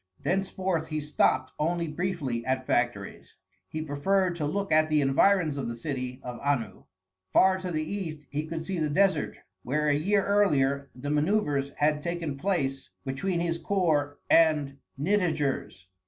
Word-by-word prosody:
Thenceforth 185 Hz, -3 st, -1 dB
he 155 Hz, -1 st, -2 dB
stopped 145 Hz, -3 st, +1 dB
only 170 Hz, +2 st, 0 dB
briefly 150 Hz, -7 st, -2 dB
at 130 Hz, +1 st, -1 dB
factories. 120 Hz, -6 st, -2 dB, 0.3 s
He 155 Hz, +7 st, -4 dB
preferred 175 Hz, +5 st, +1 dB
to 150 Hz, -3 st, -1 dB
look 200 Hz, +5 st, -2 dB
at 155 Hz, 0 st, +4 dB
the 155 Hz, -1 st, +3 dB
environs 150 Hz, +3 st, +3 dB
of 140 Hz, -, -3 dB
the 115 Hz, -, -4 dB
city 125 Hz, -1 st, -4 dB
of 125 Hz, -1 st, -6 dB
Anu. 140 Hz, -8 st, -2 dB, 0.5 s
Far 190 Hz, 0 st, +5 dB
to 185 Hz, -1 st, -4 dB
the 155 Hz, -2 st, -1 dB
east 160 Hz, -4 st, -5 dB
he 150 Hz, +2 st, -2 dB
could 160 Hz, 0 st, -5 dB
see 190 Hz, -3 st, -3 dB
the 155 Hz, -1 st, 0 dB
desert 185 Hz, 0 st, +2 dB, 0.2 s
where 150 Hz, +6 st, 0 dB
a -, -, +4 dB
year 195 Hz, +7 st, +2 dB
earlier 140 Hz, -9 st, +2 dB
the 135 Hz, +3 st, -5 dB
manœuvres 150 Hz, -3 st, +1 dB
had 150 Hz, 0 st, +1 dB
taken 170 Hz, -3 st, -3 dB
place 135 Hz, -5 st, -1 dB, 0.2 s
between 170 Hz, +7 st, -1 dB
his 170 Hz, -1 st, -1 dB
corps 155 Hz, -8 st, +1 dB
and 150 Hz, -4 st, +3 dB, 0.2 s
Nitager's. 155 Hz, -, 0 dB
155 Hz, 155 wpm, -28 LUFS, 140-180 Hz, 0.5 s, Far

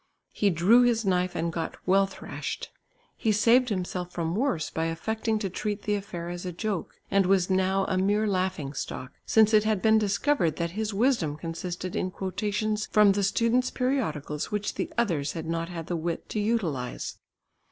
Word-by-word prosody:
He 205 Hz, -, +2 dB
drew 190 Hz, +8 st, +5 dB
his 235 Hz, -3 st, +2 dB
knife 180 Hz, -1 st, +1 dB
and 165 Hz, 0 st, -1 dB
got 165 Hz, -1 st, -3 dB
well 195 Hz, +1 st, +4 dB
thrashed. 195 Hz, -, -6 dB, 0.4 s
He 220 Hz, -, +1 dB
saved 235 Hz, +4 st, +4 dB
himself 180 Hz, -2 st, -3 dB
from 165 Hz, -1 st, -2 dB
worse 210 Hz, -, 0 dB
by 160 Hz, -, -1 dB
affecting 220 Hz, +7 st, -1 dB
to 210 Hz, -2 st, -2 dB
treat 205 Hz, +2 st, -3 dB
the 210 Hz, -, 0 dB
affair 180 Hz, -4 st, -4 dB
as 175 Hz, 0 st, -5 dB
a 180 Hz, -, -3 dB
joke, 195 Hz, +1 st, -4 dB
and 195 Hz, -2 st, +3 dB
was 190 Hz, -1 st, +3 dB
now 190 Hz, +1 st, +2 dB
a 185 Hz, -, 0 dB
mere 205 Hz, +3 st, +2 dB
laughing 185 Hz, -8 st, -1 dB
stock, 130 Hz, -1 st, -5 dB, 0.2 s
since 220 Hz, 0 st, +5 dB
it 210 Hz, -1 st, +6 dB
had 215 Hz, -2 st, +1 dB
been 220 Hz, +2 st, +4 dB
discovered 200 Hz, -, +1 dB
that 170 Hz, -1 st, -2 dB
his 215 Hz, +3 st, -2 dB
wisdom 200 Hz, -, +1 dB
consisted 175 Hz, +2 st, -5 dB
in 185 Hz, -, 0 dB
quotations 210 Hz, +3 st, -2 dB
from 210 Hz, -1 st, +5 dB
the 200 Hz, +1 st, +1 dB
students' 230 Hz, +5 st, +2 dB
periodicals 160 Hz, -, -2 dB
which 210 Hz, -1 st, -2 dB
the -, -, -3 dB
others 165 Hz, -12 st, 0 dB
had 165 Hz, -1 st, -5 dB
not 165 Hz, +1 st, -2 dB
had 165 Hz, -2 st, -6 dB
the 175 Hz, -, -2 dB
wit 165 Hz, 0 st, -3 dB
to 215 Hz, -, -2 dB
utilise. 185 Hz, -, -2 dB
195 Hz, 185 wpm, -27 LUFS, 170-215 Hz, 0.4 s, it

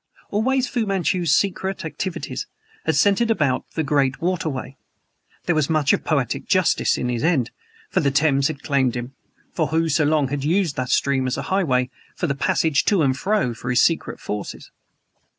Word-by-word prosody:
Always 255 Hz, +5 st, +1 dB
Fu 230 Hz, -3 st, -1 dB
Manchu's 185 Hz, -4 st, 0 dB
secret 190 Hz, +2 st, 0 dB
activities 175 Hz, +3 st, -4 dB, 0.4 s
had -, -, +2 dB
centered 205 Hz, +3 st, +3 dB
about 150 Hz, -, 0 dB
the 160 Hz, -, 0 dB
great 135 Hz, -2 st, +1 dB
waterway. 160 Hz, -7 st, -2 dB, 0.7 s
There 175 Hz, -, +2 dB
was 155 Hz, -2 st, +1 dB
much 155 Hz, -3 st, +3 dB
of -, -, 0 dB
poetic -, -, -1 dB
justice -, -, +2 dB
in 125 Hz, -, -2 dB
his 120 Hz, -2 st, -2 dB
end; 155 Hz, -8 st, +1 dB, 0.4 s
for -, -, +2 dB
the 140 Hz, -, +2 dB
Thames 140 Hz, -1 st, +2 dB
had 145 Hz, -3 st, -6 dB
claimed 135 Hz, -4 st, +1 dB
him, 120 Hz, +2 st, -5 dB, 0.4 s
who 160 Hz, 0 st, +1 dB
so 155 Hz, +1 st, +2 dB
long 150 Hz, -2 st, +2 dB
had 140 Hz, 0 st, -3 dB
used 170 Hz, 0 st, +1 dB
the 130 Hz, -1 st, -2 dB
stream 135 Hz, 0 st, +1 dB
as 125 Hz, -, -2 dB
a -, -, -3 dB
highway 130 Hz, -10 st, +1 dB, 0.2 s
for -, -, -2 dB
the 145 Hz, -, 0 dB
passage 140 Hz, +2 st, +1 dB
to 195 Hz, -6 st, +3 dB
and 130 Hz, -2 st, +2 dB
fro 195 Hz, -, 0 dB
for 120 Hz, +2 st, -7 dB
his 125 Hz, -1 st, +4 dB
secret 165 Hz, -, 0 dB
forces. 105 Hz, -1 st, -6 dB
150 Hz, 180 wpm, -22 LUFS, 135-180 Hz, 0.7 s, his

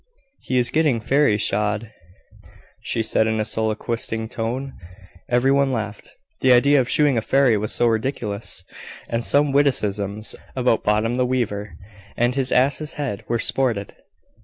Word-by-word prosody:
"He 130 Hz, -, -2 dB
is 120 Hz, -1 st, +2 dB
getting 150 Hz, -7 st, +2 dB
Fairy 135 Hz, -1 st, +2 dB
shod," 105 Hz, +1 st, -1 dB, 0.9 s
she 115 Hz, -, -2 dB
said 110 Hz, 0 st, +2 dB
in 110 Hz, 0 st, 0 dB
a 110 Hz, -, 0 dB
soliloquising 110 Hz, +1 st, -2 dB
tone. 125 Hz, +5 st, -4 dB, 0.6 s
Every 125 Hz, +2 st, +3 dB
one 140 Hz, -1 st, +2 dB
laughed, 110 Hz, -4 st, -4 dB, 0.3 s
the 130 Hz, -, +3 dB
idea 140 Hz, +3 st, +5 dB
of 125 Hz, -, -4 dB
shoeing 145 Hz, -5 st, +3 dB
a -, -, -4 dB
fairy 135 Hz, 0 st, +3 dB
was 105 Hz, +1 st, -2 dB
so 120 Hz, -, +1 dB
ridiculous! 110 Hz, -2 st, -2 dB, 0.4 s
and 115 Hz, 0 st, -2 dB
some 145 Hz, +2 st, +2 dB
witticisms, 105 Hz, -7 st, 0 dB, 0.2 s
about 125 Hz, -3 st, +1 dB
Bottom 105 Hz, +3 st, +1 dB
the 125 Hz, -, +2 dB
Weaver, 105 Hz, -5 st, -2 dB, 0.4 s
and 120 Hz, +1 st, +2 dB
his 130 Hz, -1 st, -1 dB
ass's 140 Hz, +4 st, +2 dB
head, 135 Hz, -9 st, -4 dB
were 120 Hz, -, 0 dB
sported. 115 Hz, -4 st, 0 dB
120 Hz, 150 wpm, -22 LUFS, 110-135 Hz, 0.9 s, idea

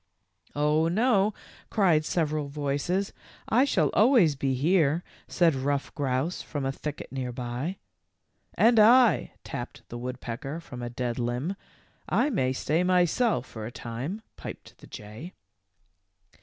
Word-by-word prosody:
" -, -, -51 dB
Oh, 150 Hz, +2 st, +2 dB
no," 210 Hz, +2 st, +3 dB, 0.4 s
cried 175 Hz, -8 st, +3 dB
several 155 Hz, -3 st, 0 dB
voices. 145 Hz, +7 st, -1 dB, 0.2 s
" -, -, -19 dB
I 265 Hz, -, +6 dB
shall 165 Hz, -, +2 dB
al 215 Hz, +6 st, +6 dB
ways 185 Hz, -, +5 dB
be 135 Hz, -1 st, 0 dB
here," 160 Hz, +2 st, +2 dB, 0.2 s
said 170 Hz, -3 st, +3 dB
Ruff 140 Hz, +1 st, -2 dB
Grouse 140 Hz, +3 st, -1 dB
from 145 Hz, -3 st, -4 dB
a 135 Hz, -, 0 dB
thicket 150 Hz, +2 st, -6 dB
near 130 Hz, -2 st, -3 dB
by. 125 Hz, +9 st, -4 dB, 0.8 s
?r -, -, +4 dB
And 235 Hz, -1 st, +5 dB
I," 235 Hz, +2 st, +5 dB
tapped -, -, -7 dB
the 120 Hz, -, -6 dB
woodpecker 125 Hz, +4 st, -5 dB
from 125 Hz, -7 st, -9 dB
a 120 Hz, -, -4 dB
dead 120 Hz, 0 st, -3 dB
limb. 125 Hz, +10 st, -2 dB, 0.5 s
"I 295 Hz, -, +2 dB
may 130 Hz, -, +1 dB
stay 155 Hz, +6 st, 0 dB
myself 180 Hz, -, +2 dB
for 110 Hz, -1 st, -7 dB
a -, -, -7 dB
time," 130 Hz, -, -5 dB
piped -, -, -9 dB
the -, -, -14 dB
jay. 110 Hz, -, -9 dB
150 Hz, 150 wpm, -27 LUFS, 130-185 Hz, 0.8 s, I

